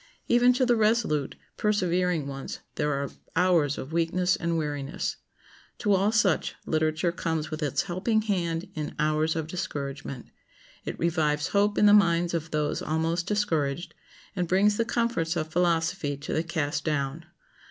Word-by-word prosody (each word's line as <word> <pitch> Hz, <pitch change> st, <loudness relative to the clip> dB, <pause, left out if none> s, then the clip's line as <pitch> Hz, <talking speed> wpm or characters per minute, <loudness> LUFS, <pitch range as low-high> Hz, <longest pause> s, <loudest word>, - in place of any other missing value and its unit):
Even 245 Hz, +1 st, +5 dB
to 255 Hz, +1 st, +2 dB
the 245 Hz, -1 st, +3 dB
resolute, 215 Hz, -, +1 dB, 0.2 s
persevering 180 Hz, -6 st, +1 dB
ones 135 Hz, -1 st, -6 dB, 0.2 s
there 150 Hz, -, 0 dB
are 140 Hz, 0 st, -2 dB, 0.2 s
hours 170 Hz, -6 st, +3 dB
of 140 Hz, +4 st, -7 dB
weakness 180 Hz, +3 st, +2 dB
and 170 Hz, -2 st, -1 dB
weariness. 145 Hz, -2 st, -3 dB, 0.6 s
To 205 Hz, -2 st, +1 dB
all 195 Hz, +2 st, +3 dB
such 205 Hz, -6 st, +2 dB
literature 155 Hz, +2 st, +1 dB
comes 160 Hz, -2 st, -2 dB
with 155 Hz, +1 st, -4 dB
its 145 Hz, -3 st, 0 dB
helping 210 Hz, +5 st, 0 dB
hand 175 Hz, -4 st, -1 dB
in 155 Hz, -4 st, -5 dB
hours 155 Hz, +1 st, +1 dB
of 160 Hz, -2 st, -2 dB
discouragement. 140 Hz, -5 st, -5 dB, 0.5 s
It -, -, -4 dB
revives 155 Hz, -3 st, +1 dB
hope 205 Hz, +1 st, +2 dB
in -, -, +5 dB
the 205 Hz, -, +7 dB
minds 170 Hz, -4 st, +4 dB
of 165 Hz, -1 st, -2 dB
those 150 Hz, -1 st, -1 dB
almost 165 Hz, +2 st, -1 dB
discouraged, 170 Hz, -7 st, -1 dB, 0.4 s
and 180 Hz, -2 st, -1 dB
brings 205 Hz, +4 st, +3 dB
the 230 Hz, -, +1 dB
comforts 230 Hz, -8 st, 0 dB
of 155 Hz, -2 st, -2 dB
philosophy 165 Hz, -3 st, +1 dB
to 145 Hz, -, -5 dB
the 160 Hz, -, +1 dB
cast 155 Hz, -3 st, -2 dB
down. 150 Hz, +1 st, -2 dB
165 Hz, 155 wpm, -27 LUFS, 150-190 Hz, 0.6 s, the